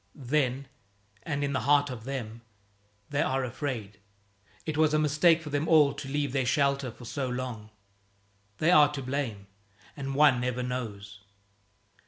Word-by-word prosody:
Then, 135 0 -1 0.5
and 145 +4 -3
in 140 0 -1
the - - +1
heart 145 0 +3
of 115 -3 -8
them, 120 -4 -5 0.7
they 145 - +1
are 135 0 0
afraid. 120 -5 -5 0.7
It 155 - -3
was 155 0 +3
a - - +4
mistake 155 +2 +3
for 150 - -7
them 145 +2 -1
all 150 -4 +5
to 135 - -7
leave 145 -1 -1
their 135 -2 +1
shelter 140 +1 +1
for 120 +1 -12
so 130 +2 -3
long. 125 -4 -5 0.9
They 160 +3 +3
are 150 -4 +6
to 135 -2 -4
blame. 125 -7 -3 0.5
And 135 -1 -4
one 140 -4 +5
never 125 0 -2
knows. 105 -5 -5
135 Hz, 160 wpm, -28 LUFS, 125-145 Hz, 0.9 s, are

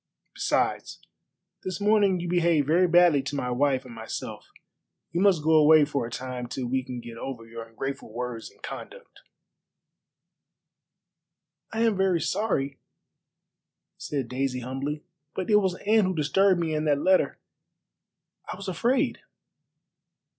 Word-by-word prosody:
Besides, - - -1 0.6
this 185 -2 -4
morning 205 -3 +3
you 175 - -4
behaved 170 -4 +2
very 175 +5 +3
badly 175 -4 +5
to 140 +2 -5
my 125 -3 -2
wife 135 +1 +1
and 125 - -10
myself. 110 0 -7 0.6
You 170 +2 -1
must 190 -6 +4
go 160 - +2
away 155 -1 +7
for 140 -5 -2
a - - -8
time 125 0 -5
till 125 +1 -4
we 130 +2 0
can 125 -1 -6
get 115 -1 -10
over 120 -4 -6
your 115 0 -8
ungrateful 115 +3 -6
words 120 0 -5
and - - -26
conduct." - - -9 2.5
"I 225 - -2
am 225 -3 +3
very 190 -3 +2
sorry," 145 -7 -1 1.2
said 140 -5 -4
Daisy 125 0 -2
humbly, 135 +4 -4 0.3
"but 190 +3 -2
it 210 - +7
was 190 -3 +1
Anne 215 0 +4
who 185 0 -1
disturbed 185 +5 +3
me, 165 -2 -1
and 155 0 -1
that 145 -1 +3
letter. 185 +5 +2 1.1
I - - -4
was 195 - -9
afraid." 235 +9 0
150 Hz, 145 wpm, -26 LUFS, 130-185 Hz, 2.5 s, away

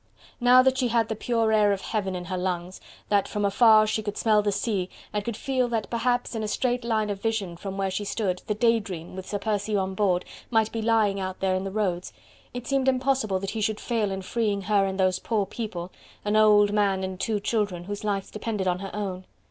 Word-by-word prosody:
Now 250 +1 +7
that 265 0 +2
she 255 - +2
had 230 -1 +1
the 220 - -1
pure 225 0 0
air 210 -1 +4
of 195 -1 -1
heaven 195 -4 -2
in 180 0 -5
her 185 +1 -3
lungs, 180 0 -3 0.3
that 205 -1 +2
from 205 -1 -1
afar 215 +1 +6
she 215 0 -1
could 205 -1 -5
smell 215 -2 +3
the 205 0 0
sea, 200 -2 -1 0.2
and 210 -1 -1
could 230 0 -4
feel 260 -2 0
that 230 -3 -2
perhaps 245 +1 0
in 225 - -2
a 215 - -2
straight 245 +3 0
line 220 -3 0
of 200 -1 -5
vision 215 -6 -1
from 195 +2 -6
where 195 -1 -1
she 205 - -2
stood, 195 -3 -2
the 210 - 0
"Day 230 +1 +3
Dream" 180 -5 -7
with 190 0 -7
Sir 205 - -2
Percy 210 0 -1
on 190 -1 0
board, 185 -2 +1 0.2
might 220 -2 +2
be 225 - -3
lying 220 -3 +2
out 185 -1 -4
there 190 -1 +1
in 185 +1 -1
the - - -2
roads, 185 -4 -2 0.4
it 245 0 -6
seemed 270 0 0
impossible 260 -6 +1
that 195 +1 -4
he 220 - -3
should 215 0 0
fail 225 -4 -1
in 190 0 -4
freeing 205 -1 -1
her 200 0 +3
and 190 0 -4
those 185 -1 +2
poor 215 -2 0
people 185 -4 -5 0.3
an 210 +1 +1
old 210 -1 +5
man 200 -2 +2
and 185 -1 -4
two 215 -1 0
children 200 -4 -1
whose 205 +3 -6
lives 200 -2 -2
depended 210 -3 -3
on 180 0 +1
her 195 0 -5
own. 190 -3 -4
210 Hz, 235 wpm, -26 LUFS, 190-225 Hz, 0.4 s, Now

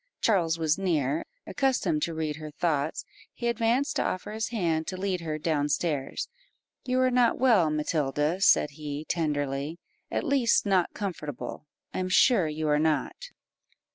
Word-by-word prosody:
Charles 170 -7 +2
was 160 +1 +1
near; 155 -6 0 0.2
accustomed 255 - 0
to 165 +1 -1
read 155 -2 -2
her 155 -1 -7
thoughts, 150 0 -1 0.3
he 240 - -3
advanced 235 +4 +1
to - - +2
offer 185 +3 -3
his 220 +1 -2
hand 165 -8 -1
to 185 - -4
lead 185 -2 -1
her 155 -2 -3
down 150 -2 0
stairs 145 -2 -1 0.6
"You 255 0 +1
are 255 0 +3
not 245 -2 +3
well, 225 -11 +4
Matilda," 150 +2 0
said 150 - +5
he, 150 0 -6
tenderly 145 -1 -2 0.3
"at - - -1
least 270 -9 +2
not 190 -3 +1
comfortable 150 - -5 0.3
I - - -2
am 185 0 -2
sure 185 -2 +4
you 155 0 -3
are 150 0 +3
not." 155 -3 -1
165 Hz, 160 wpm, -27 LUFS, 150-200 Hz, 0.6 s, said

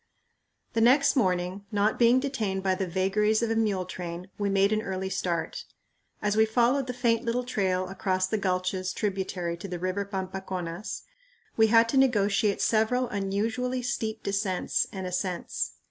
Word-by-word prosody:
The 225 - +1
next 280 +5 +5
morning, 185 -3 0
not 210 +1 +1
being 240 +2 +6
detained 220 -9 -2
by 190 -1 +2
the 185 0 -2
vagaries 210 +5 +1
of 230 - 0
a - - +1
mule 205 -5 +1
train, 180 0 -7
we 205 -1 0
made 195 +1 +3
an 215 - +1
early 190 -2 -3
start. 185 - -2 0.6
As 205 0 +1
we 220 - +5
followed 245 +4 +2
the - - -1
faint 235 -2 +1
little 240 +1 0
trail 190 -6 0
across 185 0 0
the 215 +3 -1
gulches 185 -1 -1
tributary 190 -4 -2
to 175 - -7
the 180 -1 -4
river 185 +3 -1
Pampaconas, 190 -1 -5 0.5
we 220 0 +5
had 230 +1 +5
to 270 - +1
negotiate 210 -5 +3
several 235 +3 +2
unusually 220 +6 -1
steep 225 -2 -3
descents 200 -2 0
and 190 -2 -5
ascents. 180 0 -2
200 Hz, 160 wpm, -27 LUFS, 185-230 Hz, 0.6 s, being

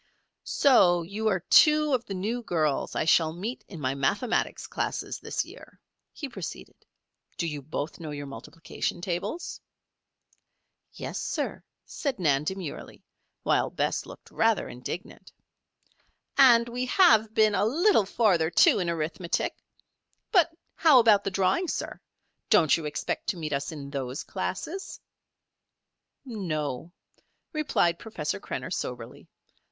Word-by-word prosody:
"So 175 -11 +4
you 205 +6 -3
are 190 -4 +1
two 300 - +5
of 245 -2 0
the 195 - -5
new 220 +6 -2
girls 155 -9 -1
I - - 0
shall 160 -1 +4
meet 210 +9 -5
in 175 - -9
my 130 -2 -1
mathematics 200 - 0
classes - - -3
this - - -2
year," - - -14 0.3
he 290 - -6
proceeded. 195 - -7 0.6
"Do - - -1
you 150 -3 -4
both 150 +3 -5
know 160 -2 -6
your 145 -1 -5
multiplication 165 +5 -5
tables?" 175 - -4 1.3
"Yes, - - -5
sir," - - -3 0.2
said 280 -4 -3
Nan 150 -5 +2
demurely, 190 -3 -6 0.4
while - - +2
Bess - - -1
looked - - -13
rather 225 -1 +2
indignant. 125 - -8 1.0
"And 240 -4 +7
we 250 +2 -3
have 250 - +5
been 215 -1 +4
a - - +2
little 295 - +3
farther, 185 -8 +2
too, 170 - +5
in 175 -2 -1
arithmetic. 170 +2 -2 0.8
But 345 -5 +4 0.2
how 315 -5 +5
about 225 -4 +6
the - - +1
drawing, 195 - +1
sir? - - -4 0.5
Don't 170 -9 +5
you 165 - -4
expect 150 - -3
to 190 - -1
meet 155 -3 -4
us 140 +3 -2
in 140 -3 -8
those 135 -1 -4
classes?" 310 - -5 1.3
"No," 165 - -4 0.6
replied 175 - +1
Professor 150 - -4
Krenner, - - -5
soberly. - - -6
185 Hz, 135 wpm, -27 LUFS, 155-235 Hz, 1.3 s, And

